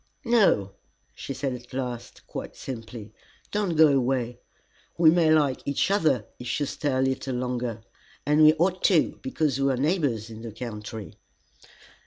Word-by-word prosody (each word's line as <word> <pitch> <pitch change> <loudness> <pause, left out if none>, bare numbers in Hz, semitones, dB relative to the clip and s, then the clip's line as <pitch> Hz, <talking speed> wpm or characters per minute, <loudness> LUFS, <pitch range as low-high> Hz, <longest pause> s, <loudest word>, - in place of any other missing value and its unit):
"No," 205 - +3 0.4
she - - -7
said 135 0 -2
at 125 0 -10
last, 125 -3 -5
quite - - -7
simply, 115 -4 -8 0.4
"don't 205 -5 -1
go 155 -1 +7
away. 125 -3 0 0.6
We 165 -2 +6
may 165 -2 +3
like 145 -4 +2
each 140 +7 0
other, 155 -10 +2
if 125 - -3
you 145 - 0
stay 145 0 -2
a 130 - +1
little 130 0 -1
longer 125 -3 -3 0.4
and 150 +2 +3
we 155 0 +8
ought 180 +2 0
to, 175 -6 +3
because 155 - -1
we 135 0 +3
are 130 - -1
neighbors 135 - 0
in 110 0 -9
the 115 -2 -7
country." 110 -2 -7
135 Hz, 160 wpm, -26 LUFS, 120-155 Hz, 0.6 s, we